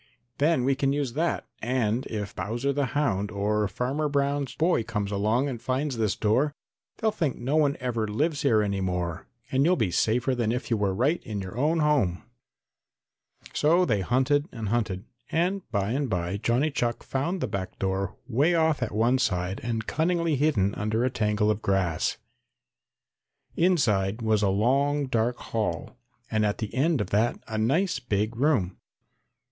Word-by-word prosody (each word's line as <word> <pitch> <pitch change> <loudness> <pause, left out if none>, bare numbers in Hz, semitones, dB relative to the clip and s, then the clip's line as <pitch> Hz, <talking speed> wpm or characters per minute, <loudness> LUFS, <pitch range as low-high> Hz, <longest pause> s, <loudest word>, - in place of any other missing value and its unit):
"Then 150 -2 +3
we 135 +2 +3
can 135 0 0
use 140 -4 -1
that, 165 +4 -1 0.2
and 120 0 0
if 105 -3 -5
Bowser 120 +6 -1
the 140 -1 0
Hound 105 -9 +1
or 105 +1 0
Farmer 135 +9 -1
Brown's 140 -1 0
boy 165 -5 +2
comes 105 -3 -3
along 110 +7 +1
and 120 -5 -5
finds 135 +1 -1
this 110 -4 +1
door 130 +8 +1 0.4
they'll 220 -1 +1
think 160 -10 -1
no 130 +5 -1
one 145 -2 +3
ever 120 -4 -1
lives 145 +8 0
here 115 -8 +3
any 100 -1 -1
more 90 -3 -2 0.2
and 135 +1 +3
you'll 175 +4 +4
be 110 - 0
safer 120 +8 +1
than 120 -3 0
if 125 +1 -3
you - - +4
were 100 -2 +1
right 140 - +1
in 105 -4 -4
your 95 0 -6
own 155 +6 +1
home." 135 -13 +2 1.3
So 170 +5 +3
they 105 - +1
hunted 135 - +2
and 110 -4 -4
hunted, 105 -4 -1 0.3
and 180 +4 +1
by 100 -2 -1
and 135 +1 -1
by 90 0 -1
Johnny 120 +8 +1
Chuck 120 -3 -1
found 165 +8 -2
the 130 - -1
back 100 -3 -5
door 95 0 -2
way 140 +8 +2
off 160 -3 +2
at 125 - -1
one 120 +4 +2
side 95 -4 -1
and 115 -2 -2
cunningly 170 +2 +1
hidden 130 -9 +2
under 110 +3 0
a 130 - 0
tangle 105 -2 +1
of 105 0 -3
grass. 95 -6 0 1.4
Inside 115 - +2
was 110 -1 +2
a 100 - +3
long 140 +8 +2
dark 120 -1 0
hall 110 +2 -3 0.4
and 110 -1 +2
at 105 -1 +1
the 110 - -5
end 145 0 +2
of 100 - -4
that 110 +4 +2
a 110 -1 -3
nice 140 - +1
big 110 -2 -1
room. 120 - +1
120 Hz, 175 wpm, -26 LUFS, 105-145 Hz, 1.4 s, you'll